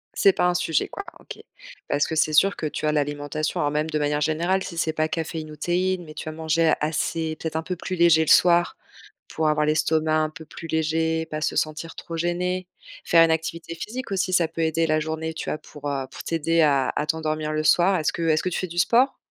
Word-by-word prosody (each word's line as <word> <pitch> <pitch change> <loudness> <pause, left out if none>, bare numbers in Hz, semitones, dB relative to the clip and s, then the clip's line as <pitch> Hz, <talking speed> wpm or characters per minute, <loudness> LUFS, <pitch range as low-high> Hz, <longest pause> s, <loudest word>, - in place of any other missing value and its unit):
C'est 195 - +5
pas - - +1
un 180 - +2
sujet, 160 -4 0
quoi, 400 - -7 0.2
OK. - - -10 0.5
Parce 145 - +2
que 160 - -3
c'est 155 0 +2
sûr 195 +6 +4
que 155 - -3
tu 150 - -4
as 155 - +2
l'alimentation, 145 +1 -2
alors 145 - +1
même 150 +2 -1
de 155 - -1
manière 150 0 0
générale 170 +5 +1
si 170 - -7
c'est 160 -1 0
pas 155 0 0
caféine 160 -1 -4
ou 150 - -9
théine, 175 +3 -1
mais 155 - -11
tu - - -7
vas 155 - -4
manger 160 0 +2
assez, 160 +1 -1
peut-être 160 -1 -5
un 160 - -1
peu 180 +2 -4
plus 185 +2 -5
léger 170 -2 +5
le - - -3
soir, 175 0 +4 0.5
pour 155 -1 0
avoir 150 0 +2
l'estomac 155 +1 +1
un 155 0 +1
peu 160 0 -11
plus 165 - -9
léger, 160 +1 0
pas 155 -1 -5
se - - -1
sentir 155 +2 -2
trop 165 - -7
gênée, 180 +2 -1 0.4
faire 165 -1 +6
une 165 - +2
activité 165 +1 -2
physique 235 +9 -6
aussi, 185 -1 0
ça 170 -3 +3
peut 165 0 -4
aider 160 +1 +1
la 155 0 +1
journée, 160 +1 -4
tu - - -4
vois, - - -2
pour, 145 -1 -9
heu, 135 -2 -2
pour - - -9
t'aider 165 0 0
à 140 -3 +3
à 150 - 0
t'endormir 155 -1 -2
le 155 0 0
soir. 175 +5 +4
Est-ce 155 - 0
que - - -4
est-ce 155 -1 +2
que 185 - -1
tu 180 - -3
fais 185 - -2
du 175 0 -8
sport? 245 +9 +3
160 Hz, 240 wpm, -24 LUFS, 155-170 Hz, 0.5 s, faire